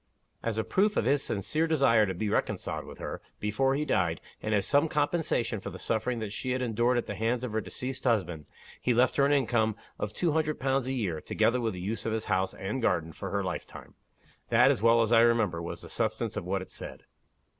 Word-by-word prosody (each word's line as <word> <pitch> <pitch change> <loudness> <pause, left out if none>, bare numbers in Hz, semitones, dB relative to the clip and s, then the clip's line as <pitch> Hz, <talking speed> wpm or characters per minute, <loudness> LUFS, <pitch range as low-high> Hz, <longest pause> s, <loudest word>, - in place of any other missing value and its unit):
As 115 -2 -2
a 110 - +1
proof 205 - +1
of - - +2
his 140 +2 +3
sincere 155 - -1
desire 130 -9 +4
to 95 - -3
be 105 +5 -2
reconciled - - -1
with - - -10
her, - - -6 0.2
before 135 +6 +1
he 150 +2 -1
died, 85 - +1 0.2
and 110 - -3
as 100 -3 +2
some 145 +3 +3
compensation 145 -7 0
for 100 - -6
the 95 - -8
sufferings 115 +3 -1
that 105 -2 -4
she 125 +3 -2
had 130 - -1
endured 120 +1 +2
at 120 - 0
the - - -4
hands 115 +4 -1
of 125 - -3
her 110 0 0
deceased 130 +4 -5
husband, 90 - 0 0.3
he 125 - +2
left 125 +1 +3
her 140 -1 +5
an - - +1
income 115 -6 +2 0.2
of 105 - -2
two 170 +9 0
hundred 155 0 0
pounds 135 -1 0
a 130 - -1
year, 95 -11 -2
together 125 +1 +1
with 115 -3 -1
the - - -6
use 110 +5 -3
of 110 - 0
his 110 0 -2
house 95 0 0
and 105 +7 -3
garden, 80 -7 0
for - - -6
her - - -1
lifetime. - - -6 0.6
That, - - +6
as - - -1
well 115 0 +5
as 115 - -1
I 115 - +7
remember, 115 -8 +3
was 85 - -6
the - - -10
substance - - -1
of - - -4
what 95 +1 -1
it - - -15
said." - - -8
115 Hz, 235 wpm, -29 LUFS, 105-130 Hz, 0.6 s, I